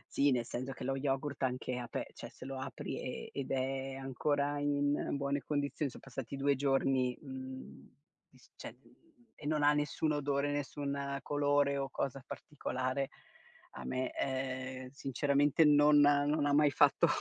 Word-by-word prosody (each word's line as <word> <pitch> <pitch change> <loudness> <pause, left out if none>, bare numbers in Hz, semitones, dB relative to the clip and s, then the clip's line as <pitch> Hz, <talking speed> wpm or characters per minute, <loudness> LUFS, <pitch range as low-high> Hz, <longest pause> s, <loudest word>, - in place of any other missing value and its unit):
Sì, 140 +1 +4
nel 125 -3 +1
senso 130 +3 -4
che - - -8
lo 135 +1 0
yogurt 135 0 -2
anche 125 -1 -1
ape 120 - -4
cioè - - -8
se - - -12
lo 135 0 -5
apri, - - -5
ehm, - - -5
ed 140 -2 -4
è 135 0 -1
ancora 140 +2 0
in 145 0 +1
buone 140 0 -1
condizioni, 145 0 -1
son - - -11
passati 135 0 -6
2 140 +1 +3
giorni, 135 -2 +1
mhmm, 130 -2 -9 0.4
e - - -22
s - - -22
cioè - - -8 0.6
e 145 - -8
non 150 -1 +1
ha 145 - +7
non 150 - +3
nessun 150 +1 0
odore, 145 -1 0
nessun 140 -1 -2
colore 145 -1 +2
o 135 0 -2
cosa 135 0 -3
particolare, 130 -1 -3 0.6
a 65 - -8
me, 130 - -1
ehm, 130 -1 -3
sinceramente 140 +3 +2
non 145 0 +6
non 145 +1 +4
ha 145 - +2
mai 150 0 +6
fatto 140 - +4
140 Hz, 165 wpm, -34 LUFS, 130-145 Hz, 0.6 s, ha